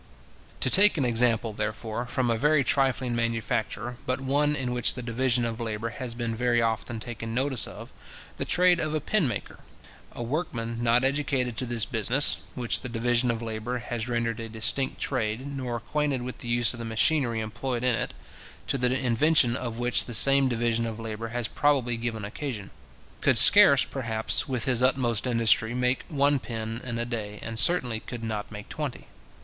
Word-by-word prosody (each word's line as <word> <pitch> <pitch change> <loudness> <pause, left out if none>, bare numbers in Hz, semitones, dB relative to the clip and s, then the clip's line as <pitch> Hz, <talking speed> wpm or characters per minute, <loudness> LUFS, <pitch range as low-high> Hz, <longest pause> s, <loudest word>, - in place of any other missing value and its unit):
To - - +5
take 205 -1 +6
an 140 - 0
example, 115 -2 +2
therefore, 110 +3 -4
from 125 -1 -1
a - - +1
very 150 +5 +2
trifling 130 -3 0
manufacture, 115 0 -3
but 130 +1 -1
one 145 +3 0
in 125 -3 -3
which 120 -1 +3
the 125 - -7
division 120 0 0
of 115 0 -4
labour 110 0 -4
has 120 0 -5
been 120 -1 -3
very 120 +1 +1
often 115 0 -2
taken 115 -1 -6
notice 130 -1 +1
of, - - -11 0.4
the - - -2
trade 180 -1 +3
of 155 -1 0
a - - 0
pin 170 +2 0
maker: 105 -5 -6 0.5
a 120 - -6
workman 115 -4 -4
not 120 +1 +2
educated 135 -3 -1
to 130 - -3
this 115 -2 +2
business 125 +3 +2 0.2
(which 120 -2 +1
the 125 - -7
division 120 +1 0
of 115 0 -2
labour 115 +2 -4
has 120 0 -4
rendered 115 -1 -2
a 115 0 -6
distinct 115 +5 -1
trade), 110 +3 -3
nor 135 -4 -5
acquainted 140 +2 -2
with 125 0 -7
the - - -6
use 120 -1 +2
of 120 - -10
the - - -5
machinery 115 +1 +1
employed 120 +3 -4
in 125 -1 +2
it - - -4 0.5
(to 135 - -1
the 125 +1 +1
invention 130 +1 +2
of 120 -3 -5
which 120 +1 +2
the 120 - -4
same 135 +3 +5
division 115 -1 -1
of 110 0 -7
labour 115 0 -6
has 120 0 -2
probably 135 -5 0
given 115 -2 -4
occasion), 110 -2 -6 0.5
could - - +3
scarce, - - +8
perhaps, 115 -3 -1
with 125 -4 0
his 125 -2 +1
utmost 125 -3 +1
industry, 115 -1 +2
make 125 +1 -1
one 145 -2 +1
pin 115 -1 -6
in 120 -2 -4
a 120 - -2
day, 110 -4 -5
and 115 0 -3
certainly 125 -6 +4
could 120 0 -9
not 110 -2 -5
make 105 -1 -9
twenty. 150 -5 -6
120 Hz, 190 wpm, -26 LUFS, 115-130 Hz, 0.5 s, scarce